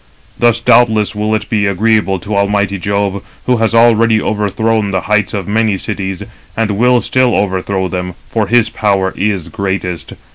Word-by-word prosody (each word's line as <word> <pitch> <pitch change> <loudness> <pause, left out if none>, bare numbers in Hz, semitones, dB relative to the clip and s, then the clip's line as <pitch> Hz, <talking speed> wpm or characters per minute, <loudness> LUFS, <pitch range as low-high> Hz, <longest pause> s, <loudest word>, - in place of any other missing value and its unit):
Thus, 120 -1 +3
doubtless, 110 -3 +3
will 105 +1 -1
it 110 - -4
be 105 -2 0
agreeable 105 0 +1
to 105 +3 -4
almighty 100 -1 0
Jove, 100 0 -1 0.2
who 125 -1 +2
has 115 0 0
already 115 -1 +4
overthrown 110 +1 -1
the 95 -1 -1
heights 105 +2 0
of 100 -5 -4
many 110 -1 +1
cities, 95 -1 -4 0.3
and 110 -1 0
will 120 +4 +3
still 130 -2 +1
overthrow 95 -1 -1
them, 90 -1 -4
for 110 -3 -1
his 115 0 +2
power 100 -3 0
is 100 -4 -2
greatest. 95 -4 -4
105 Hz, 160 wpm, -14 LUFS, 100-110 Hz, 0.3 s, already